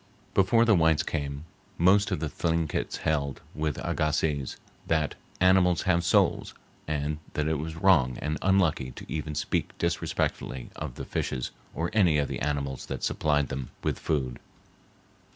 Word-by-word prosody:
Before 105 +5 +4
the 115 - +5
whites 80 -4 +4
came 70 -1 -3 0.3
most 95 +4 +4
of - - -1
the 80 - -1
Thlinkits 80 0 -1
held, 70 -4 0
with 75 -3 -2
Agassiz, 75 -3 0 0.3
that 80 -2 +1 0.3
animals 90 -2 +4
have 85 -2 +2
souls, - - +2 0.3
and 75 0 -1
that 75 0 0
it 80 -2 0
was 80 +1 -4
wrong 80 -9 +4
and 75 0 -2
unlucky 90 -9 +2
to - - -9
even 75 -1 -4
speak - - -2
disrespectfully 65 -2 -2
of - - -6
the - - -6
fishes 65 -1 -2 0.2
or 85 +2 -1
any 90 -8 +4
of 70 -1 0
the 65 -3 -3
animals 70 -2 -2
that - - -5
supplied 75 -2 +1
them 65 -2 -4
with - - -1
food. 65 -6 -1
75 Hz, 150 wpm, -28 LUFS, 70-85 Hz, 0.3 s, the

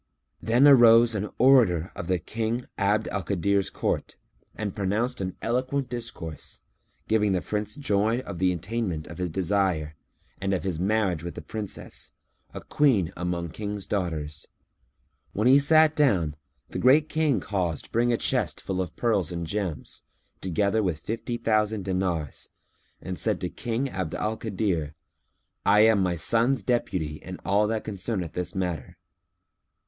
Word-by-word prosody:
Then 120 +6 +4
arose 120 -3 +7
an 105 0 -2
orator 115 -11 +4
of 85 - -6
the 90 0 +2
King 115 +6 -3
Abd 105 +1 +1
al 100 - -2
Kadir's 100 +2 0
court - - -2 0.4
and 105 -3 -4
pronounced 105 +5 -1
an 95 -1 -3
eloquent 130 +3 -1
discourse, 115 - -7 0.5
giving 105 -2 +2
the 90 - +1
Prince 105 0 -3
joy 110 -4 +1
of 100 -8 -7
the 95 0 +3
attainment 90 -2 -3
of 85 - -10
his 90 -1 -1
desire 90 -3 0 0.5
and 95 0 +1
of 90 - -3
his 90 -4 -2
marriage 95 -3 +1
with 85 - -6
the - - -6
Princess, 105 -3 -6 0.4
a - - -7
Queen 110 - +2
among 90 -1 -3
King's 105 +2 -5
daughters. 80 -6 -3 0.9
When 105 +4 +1
he 135 +2 +7
sat 155 +2 +5
down 90 - +2 0.3
the - - -4
Great 145 +5 +5
King 155 -8 +1
caused 90 -6 -3
bring 120 +1 +2
a 120 - +2
chest - - 0
full 95 -1 -2
of 90 - -5
pearls 100 -7 +1
and 85 -1 -3
gems, 95 -2 -4 0.4
together 100 +4 +1
with 90 -6 -1
fifty 115 +7 -4
thousand 110 -3 +1
dinars, 90 -6 -2 0.5
and 95 -1 -5
said - - +1
to - - -2
King 120 +3 -2
Abd 95 -9 -4
al 110 +1 -1
Kadir, 95 -9 -2 0.7
"I 105 +1 +5
am 110 -2 +5
my 90 -2 +1
son's 115 +7 +3
deputy 90 -10 -1
in 90 +2 -8
all 100 +2 +3
that 110 0 -2
concerneth 95 -4 -3
this 90 +2 -4
matter." 90 -3 -3
100 Hz, 155 wpm, -26 LUFS, 90-115 Hz, 0.9 s, arose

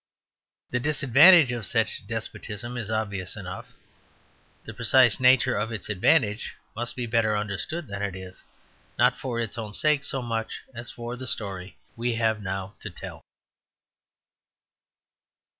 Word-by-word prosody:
The 125 - 0
disadvantage 145 +2 +6
of 120 -2 -4
such - - -1
despotism 120 +4 -5
is 115 -4 -4
obvious 100 -4 -2
enough. - - -8 0.9
The 110 - -7
precise 115 0 +4
nature 130 0 +5
of 105 +3 -2
its 110 -2 -6
advantage 105 - +2 0.2
must 120 +1 -4
be 125 - -3
better 110 -2 +1
understood 105 - -3
than 100 0 -5
it 100 -2 -2
is, 95 0 -10 0.5
not - - +4
for 120 -3 -4
its 115 0 -3
own 105 -2 -6
sake 150 +3 +2
so 135 -2 -2
much 115 -1 -3
as 120 +1 -5
for 120 +1 -6
the 130 +1 -7
story 95 -4 -5 0.2
we 120 0 -1
have 110 -1 +1
now 95 0 -4
to - - -6
tell. - - -9
115 Hz, 140 wpm, -26 LUFS, 105-125 Hz, 0.9 s, disadvantage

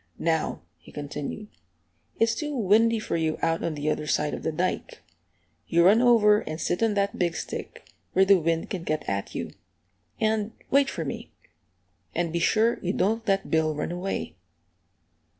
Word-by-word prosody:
"Now," 160 -1 -1 0.2
he - - -16
continued, 150 +8 -6 0.7
"it's 230 0 +3
too 295 -2 -3
windy 225 +2 +4
for 215 - -3
you 160 -1 0
out 165 0 +1
on 165 - -2
the 145 +1 -4
other 150 - -3
side 150 0 0
of - - -4
the - - -1
dike. 185 - -3 0.6
You 170 0 +4
run 210 +5 +6
over 215 -4 +5
and 155 -3 -6
sit 175 - -1
on 225 -2 +2
that 200 0 0
big 170 -3 +1
stick, - - -6 0.3
where 190 +1 +5
the 195 -1 +6
wind 165 0 -1
can't 180 -4 -3
get 155 -2 -2
at 100 0 -3
you; - - -4 0.7
and 220 0 0 0.2
wait 275 0 +4
for 165 - -4
me. 140 - -6 0.9
And 170 -1 -1
be 170 - 0
sure 225 +6 +2
you 185 +1 -1
don't 225 +3 0
let 195 -1 0
Bill 160 -1 +2
run 150 - -3
away." 180 - -4
185 Hz, 175 wpm, -26 LUFS, 160-220 Hz, 0.9 s, run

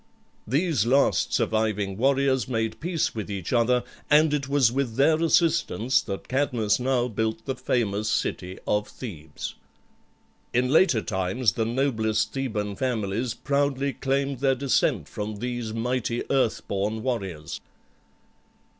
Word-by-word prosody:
These 140 - +1
last 135 +3 +3
surviving 105 -3 0
warriors 135 +1 +2
made 115 -3 -2
peace 170 -1 -1
with 110 -3 -5
each 100 -1 -4
other, 125 +1 +3 0.3
and 150 0 +5
it 140 -2 -1
was 140 -5 +4
with 130 -3 -1
their 155 +5 +3
assistance 165 -7 +2
that 95 - -6
Cadmus 125 -6 +1
now 125 -1 +1
built 110 0 -2
the 135 - -1
famous 110 -5 -1
city 95 -3 -2
of 105 0 0
Thebes. 80 - -7 1.0
In 125 +1 +2
later 150 - +4
times 95 +4 0
the 110 +5 -1
noblest 110 -3 0
Theban 105 -7 -3
families 115 -2 -1
proudly 140 -1 0
claimed 135 0 -1
their 135 -1 +2
descent 135 +1 +1
from 105 +1 -5
these 120 0 -4
mighty 120 +1 -1
earth 130 -5 +1
born 105 +3 -2
warriors. 95 -11 -3
120 Hz, 130 wpm, -25 LUFS, 110-135 Hz, 1.0 s, and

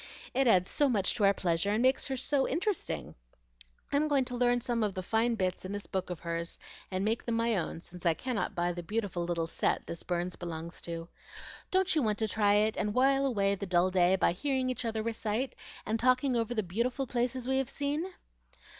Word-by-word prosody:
It 270 0 +3
adds 185 -5 +5
so 290 -2 +3
much 205 -6 +2
to 210 - +2
our 195 - +6
pleasure, 170 +1 0
and 220 - +1
makes 260 +1 +3
her 265 -1 -2
so 270 +1 +2
interesting. 365 +7 -1 0.8
I'm 290 +2 +2
going 280 -3 +2
to 250 - -5
learn 245 0 +3
some 240 -1 -1
of 210 -3 0
the 185 - -3
fine 225 +4 +1
bits 185 -3 -1
in 190 +2 -5
this 205 0 -4
book 190 -1 -3
of 175 -3 -5
hers, 170 0 -3 0.3
and 185 +1 -1
make 225 +2 0
them 235 - -1
my 230 0 +2
own, 170 -2 -3
since 180 0 -12
I 170 -2 +3
cannot 225 0 -2
buy 175 0 0
the 175 - -5
beautiful 200 -1 -2
little 170 -1 -1
set 165 - 0
this 170 - -6
Burns 175 0 -2
belongs 170 -1 -6
to. 165 -1 -5 0.6
Don't 375 0 +2
you 310 - +2
want 215 -4 +1
to 220 - 0
try 205 -1 +3
it, 215 +1 +2
and 210 0 -1
while 270 +2 +4
away 200 -6 +2
the 200 0 -4
dull 180 +1 +3
day 180 0 +4
by 185 - +3
hearing 260 +6 0
each 250 -1 -4
other 220 -1 -1
recite 230 +2 -2 0.3
and 220 +2 -1
talking 255 +2 +3
over 235 +1 0
the 215 - +1
beautiful 235 +9 -1
places 250 +1 -1
we 265 0 +2
have 270 - -2
seen?" 295 +6 -2
220 Hz, 220 wpm, -31 LUFS, 185-255 Hz, 0.8 s, our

